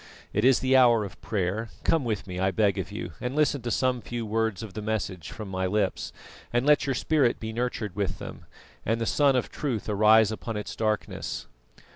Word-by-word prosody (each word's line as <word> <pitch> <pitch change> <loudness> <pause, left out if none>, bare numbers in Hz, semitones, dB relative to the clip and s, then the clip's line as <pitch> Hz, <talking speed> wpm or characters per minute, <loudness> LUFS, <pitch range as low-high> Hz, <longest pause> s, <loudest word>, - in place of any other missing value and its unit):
It 105 - +1
is 130 0 +5
the 130 0 +3
hour 120 -4 +6
of 100 - -11
prayer; 110 0 -2
come 160 -4 +2
with 110 -4 -2
me, 90 -2 -5
I 95 +1 +2
beg 100 0 +2
of - - -4
you, - - -5
and 125 +2 -3
listen 150 -2 +2
to 120 - -3
some 125 +1 +1
few 120 +1 -4
words 110 0 -1
of 105 -4 -8
the 110 - -5
message 105 -5 -3
of 105 - -5
my 95 -1 -1
lips, 105 +3 -1 0.4
and 120 +2 +1
let 150 -1 +4
your 135 - +1
spirit 140 -2 +2
be 110 0 -5
nurtured 115 -5 -2
with 100 -2 -1
them, - - -9 0.4
and 115 +2 0
the 115 - -1
Sun 140 +2 +3
of 125 - 0
Truth 125 -8 -3
arise 110 +1 +5
upon 110 0 -4
its 105 - -5
darkness." 110 -1 -2
110 Hz, 210 wpm, -27 LUFS, 105-125 Hz, 0.4 s, hour